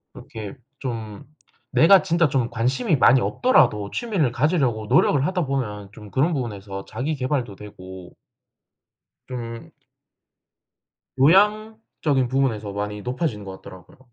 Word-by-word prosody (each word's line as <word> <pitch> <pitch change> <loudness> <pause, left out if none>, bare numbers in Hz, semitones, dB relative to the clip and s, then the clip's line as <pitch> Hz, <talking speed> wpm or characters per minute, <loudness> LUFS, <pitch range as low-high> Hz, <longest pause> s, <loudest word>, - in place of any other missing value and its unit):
그렇게 110 +3 -9 0.2
좀 110 -5 -6 0.5
내가 190 +4 +6
진짜 165 -2 +1
좀 130 -3 0
관심이 130 - 0
많이 130 -1 +5
없더라도 120 - +2
취미를 195 - -1
가지려고 130 -5 0
노력을 140 +5 +3
하다 185 -3 -1
보면 105 -8 -3
좀 105 0 -12
그런 150 - +1
부분에서 100 -7 -5
자기계발도 130 -4 -3
되고 95 -3 -11 1.1
좀 115 -2 -7 1.5
교양적인 195 - +2
부분에서 120 -6 -1
많이 105 +1 -4
높아지는 125 -3 -3
것 95 -1 -9
같더라고요. 95 +5 -14
125 Hz, 285 characters per minute, -23 LUFS, 105-150 Hz, 1.5 s, 내가